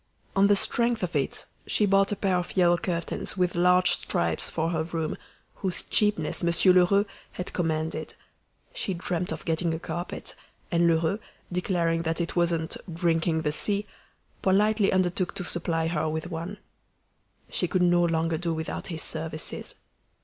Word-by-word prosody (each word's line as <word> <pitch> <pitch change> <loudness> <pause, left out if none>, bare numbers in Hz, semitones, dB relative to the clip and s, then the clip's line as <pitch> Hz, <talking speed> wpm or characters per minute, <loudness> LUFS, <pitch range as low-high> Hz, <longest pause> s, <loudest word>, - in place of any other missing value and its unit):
On 195 +1 +5
the 205 - +5
strength 235 +1 +1
of 175 -2 -2
it 140 -2 -1 0.2
she 210 - +2
bought 195 0 +3
a - - +1
pair 195 -2 +1
of 180 +2 -4
yellow 175 -1 +5
curtains 170 +2 -3
with 180 -1 +1
large 180 +1 +4
stripes 85 -1 +1
for 165 +1 -1
her 160 -2 0
room, 160 -1 -2 0.4
whose 190 -3 -2
cheapness 175 -6 +1
Monsieur 170 +2 +5
Lheureux 185 +3 +4 0.3
had 180 - -5
commended; 160 -2 -2 0.6
she 190 - -2
dreamed 175 0 -2
of 160 - -5
getting 165 0 0
a - - -5
carpet, 175 +1 -5 0.4
and 170 -1 +3
Lheureux, 165 +4 +2 0.3
declaring 175 -2 0
that 165 0 -2
it 170 - -2
wasn't 170 -1 0
"drinking 165 -1 +1
the 150 - +1
sea," 205 +6 +1 0.6
politely 205 +2 +3
undertook 185 -1 0
to 190 - -3
supply 165 -2 -1
her 160 -1 0
with 160 +3 -4
one. 170 +5 -5 0.9
She - - +1
could 185 -2 +1
no 175 0 +4
longer 165 -1 +1
do 170 -1 -1
without 160 0 -4
his 165 -3 -2
services. 155 -1 -3
175 Hz, 160 wpm, -27 LUFS, 160-185 Hz, 0.9 s, On